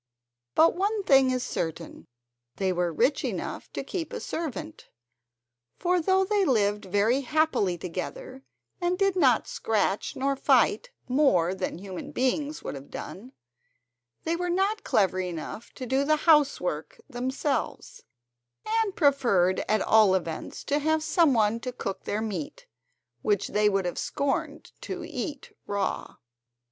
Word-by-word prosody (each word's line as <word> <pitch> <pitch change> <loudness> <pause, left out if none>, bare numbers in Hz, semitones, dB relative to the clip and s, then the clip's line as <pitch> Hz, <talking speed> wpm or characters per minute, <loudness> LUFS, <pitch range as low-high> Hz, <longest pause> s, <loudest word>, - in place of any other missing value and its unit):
But 325 +1 +6
one 405 +3 0
thing 270 -5 +5
is 255 -1 0
certain, 165 0 -5 0.5
they 190 -1 0
were 175 -1 0
rich 245 - +1
enough - - -4
to - - -3
keep 345 -4 -4
a - - -3
servant; 315 0 -5 0.9
for 360 0 +1
though 380 +3 +3
they 410 0 +2
lived 210 - +1
very 205 +7 +2
happily 300 - +1
together, 165 -6 -6 0.4
and 350 +1 +1
did 390 -1 +2
not 265 -10 +3
scratch 210 -2 -1
nor 275 +1 0
fight - - +3 0.2
more 245 - +3
than 190 -3 -3
human 185 0 -7
beings 285 +4 -1
would - - -4
have 140 0 -9
done, 245 +8 -8 0.9
they 330 +1 0
were 355 +1 -2
not 390 +4 0
clever 185 -2 +2
enough 180 +4 -5
to 255 - -7
do 265 +3 +1
the 310 +2 +3
housework 280 - +2
themselves, 265 +2 -3 0.8
and 405 -4 -2
preferred 235 - +3
at 215 -1 +3
all 215 -4 +5
events 170 -4 -4
to 290 +1 0
have 315 +1 +1
some 315 -3 +3
one 220 0 +2
to 250 +1 -4
cook 195 -6 -5
their 210 +1 -1
meat, 185 -9 -5 0.6
which 205 - 0
they 210 0 +3
would 195 -2 0
have 175 - -3
scorned 280 -1 -2
to - - -5
eat 295 -6 -6
raw. 200 -1 -2
255 Hz, 145 wpm, -27 LUFS, 195-315 Hz, 0.9 s, But